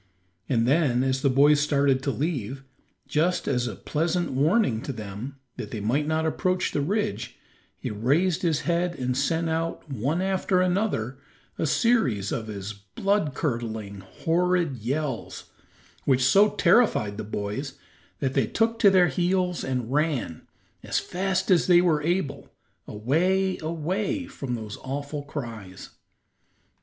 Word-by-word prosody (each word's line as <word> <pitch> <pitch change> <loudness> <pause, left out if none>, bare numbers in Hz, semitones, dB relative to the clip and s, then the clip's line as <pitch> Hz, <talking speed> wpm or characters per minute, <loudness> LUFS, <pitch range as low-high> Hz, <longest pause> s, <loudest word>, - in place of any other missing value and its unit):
And 120 -3 +2
then 135 -4 +3
as 130 0 0
the 140 - +3
boys 145 +3 +5
started 140 -2 +2
to 140 - -2
leave, 135 -3 -2 0.4
just 170 +4 +1
as 125 -1 +1
a 110 - -5
pleasant 170 - -1
warning 140 - +2
to 140 - -4
them, 110 +3 -7 0.2
that - - -5
they 110 - -5
might 130 +9 0
not 160 0 0
approach 185 +3 0
the 145 - 0
ridge, 205 +7 -2 0.4
he - - -4
raised 155 - +1
his 160 -4 +1
head 175 +1 0
and 125 0 -1
sent 165 +5 0
out, 165 +1 -2
one 135 +7 -1
after 190 0 +1
another, 180 - 0 0.4
a 160 - +1
series 135 - +2
of 110 - -3
his 105 0 -5
blood 145 - -1
curdling, 110 - -3
horrid 165 - 0
yells, 130 +3 -4 0.5
which 130 -2 +3
so 200 +10 +6
terrified 170 - +3
the 110 - -4
boys 105 +6 -4 0.4
that 135 -2 0
they - - +2
took 230 0 0
to 205 - +7
their 185 -3 +5
heels 180 +3 0
and 125 -3 -2
ran, 145 - -1 0.3
as - - -2
fast 190 +2 -1
as 175 - +4
they 175 -1 +7
were 165 -4 +2
able, 170 -2 -2 0.4
away, 180 - +1
away 180 - -2
from 140 - -5
those 110 -2 -6
awful 145 +2 -5
cries. 115 -10 -7
145 Hz, 145 wpm, -26 LUFS, 125-180 Hz, 0.5 s, to